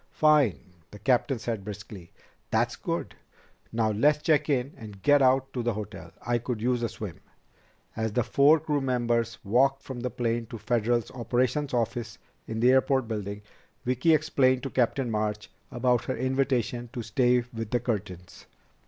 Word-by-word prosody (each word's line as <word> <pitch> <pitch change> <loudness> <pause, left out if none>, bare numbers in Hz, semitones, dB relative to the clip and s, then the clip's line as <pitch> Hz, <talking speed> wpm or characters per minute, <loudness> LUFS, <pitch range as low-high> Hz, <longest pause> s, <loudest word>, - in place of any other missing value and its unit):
"Fine," 150 - +4 0.3
the 105 - -11
captain 125 +5 +1
said 115 -3 -4
briskly. 100 -3 -9 0.4
"That's - - +1
good. - - -3 0.6
Now 110 -1 +1
let's 145 +8 +2
check 155 -1 +2
in 135 0 0
and 105 -3 -11
get 145 -1 +5
out 135 +1 +3
to 125 - -2
the 120 -2 -1
hotel. 105 -2 -7 0.2
I 120 0 +1
could 120 -1 -4
use 120 +2 0
a 115 - 0
swim." 100 -6 -7 0.8
As 110 -1 -1
the 125 - +2
four 145 +7 +5
crew 150 -2 -1
members 120 -3 0
walked 135 +6 +2
from 130 -2 -7
the 125 +1 -2
plane 115 -1 -2
to 115 0 -7
Federal's 120 +1 0
operations 125 +4 0
office 115 -2 -2 0.3
in 110 0 -3
the 125 +2 +6
airport 130 -1 +3
building, 105 -2 -4 0.4
Vicki 130 +6 +3
explained 135 -4 +2
to 135 - -4
Captain 125 0 +1
March 105 -1 -2 0.2
about 125 -1 +1
her 130 - -2
invitation 125 -2 0
to 120 -4 -4
stay 125 +3 +3 0.2
with 115 -2 -5
the 120 - +1
Curtins. 100 -7 -5
120 Hz, 165 wpm, -27 LUFS, 110-130 Hz, 0.8 s, the